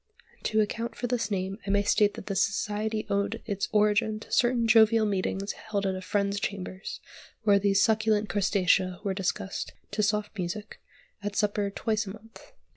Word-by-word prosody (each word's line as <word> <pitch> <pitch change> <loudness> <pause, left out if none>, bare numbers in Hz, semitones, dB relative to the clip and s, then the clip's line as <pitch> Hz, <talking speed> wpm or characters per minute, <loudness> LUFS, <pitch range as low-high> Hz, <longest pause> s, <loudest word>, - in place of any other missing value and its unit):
To 220 -1 +3
account 230 +2 -2
for 245 - -4
this 235 -3 -1
name 195 0 -2
I - - -2
may 200 0 +3
state 205 0 +3
that - - -8
the 200 - -3
society 215 +2 0
owed 200 +2 -1
its 200 -3 -2
origin 215 +1 +2
to - - -13
certain 240 -2 +3
jovial 225 0 +6
meetings 195 0 -1
held 205 -3 -3
at 190 - +1
a 185 - -5
friend's 200 +1 0
chambers, 195 -1 -5 0.4
where 200 -2 +5
these 195 0 +3
succulent 215 -1 +2
crustacea 185 -1 +2
were 200 -2 0
discussed 195 0 -3 0.2
(to 215 - 0
soft 210 +1 0
music) 205 +4 -5 0.4
at 205 0 -4
supper, 205 -1 +1
twice 215 +1 -1
a 195 - -5
month. 225 - -15
205 Hz, 175 wpm, -28 LUFS, 195-220 Hz, 0.4 s, jovial